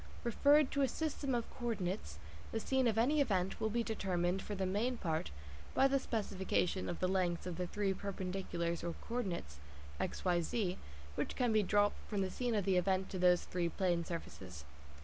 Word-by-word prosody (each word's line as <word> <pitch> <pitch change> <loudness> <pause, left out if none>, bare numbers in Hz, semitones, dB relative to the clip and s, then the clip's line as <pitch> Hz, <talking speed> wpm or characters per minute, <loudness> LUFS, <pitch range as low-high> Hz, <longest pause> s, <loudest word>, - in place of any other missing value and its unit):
Referred 285 +4 +4
to 280 - +1
a 270 - +4
system 280 -1 -1
of 235 -1 -1
co 240 - -4
ordinates, 195 - -2 0.3
the 225 - -1
scene 260 +2 +2
of 220 -1 +1
any 285 +6 +4
event 190 -8 0
will 220 - +2
be 235 +2 0
determined 190 -4 0
(for 205 - -4
the 190 -1 -1
main 220 +7 0
part) 160 - -1 0.5
by 270 - +6
the 275 0 +2
specification 190 -5 -1
of 175 - -3
the 185 - +2
lengths 180 -2 0
of 180 -2 -3
the 180 +1 -2
three 200 +1 0
perpendiculars 185 -3 -3
or 170 -1 -2
co 235 - -2
ordinates 170 - -3 0.4
(x, - - -3
y, 175 -1 +3
z) 185 +1 -1 0.3
which - - -2
can 245 -3 +2
be 215 - +5
dropped 205 +1 +3
from 205 -2 0
the 185 - -2
scene 245 -2 -1
of 205 -3 +1
the 190 -2 +3
event 190 +1 +1
to 185 - -3
those 180 -1 +5
three 175 -1 -1
plane 175 -1 +1
surfaces. 95 - -7
195 Hz, 200 wpm, -36 LUFS, 180-230 Hz, 0.5 s, by